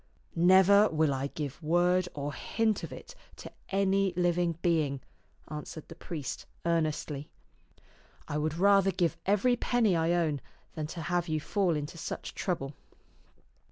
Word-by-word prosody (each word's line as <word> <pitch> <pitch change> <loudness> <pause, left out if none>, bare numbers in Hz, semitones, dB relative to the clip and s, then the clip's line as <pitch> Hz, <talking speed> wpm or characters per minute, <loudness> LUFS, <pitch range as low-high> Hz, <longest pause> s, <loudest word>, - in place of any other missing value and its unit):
" - - -37
Never 190 +4 +6
will 155 -2 +2
I 135 +1 -2
give 145 +1 -6
word 175 +3 +2
or 145 0 -3
hint 220 +3 0
of 160 - -6
it 130 - -10 0.2
to - - -10 0.2
any 195 -1 +2
living 175 -2 +1
being," 155 -5 +1 0.5
answered 150 +1 -8
the - - -7
priest 150 -7 -6 0.2
earnestly. 155 -3 -1 0.5
" - - -30
I 150 - -2
would 155 +1 -1
rather 195 +1 +5
give 175 -3 0
every 210 +5 +3
penny 235 -5 +2
I 165 +1 +2
own 160 -5 0 0.3
than 155 -2 -4
to 165 +2 -6
have 175 +1 0
you 155 -1 0
fall 180 +1 0
into 150 +3 -5
such - - -5
trouble." 150 -7 -3
170 Hz, 155 wpm, -30 LUFS, 150-190 Hz, 0.5 s, Never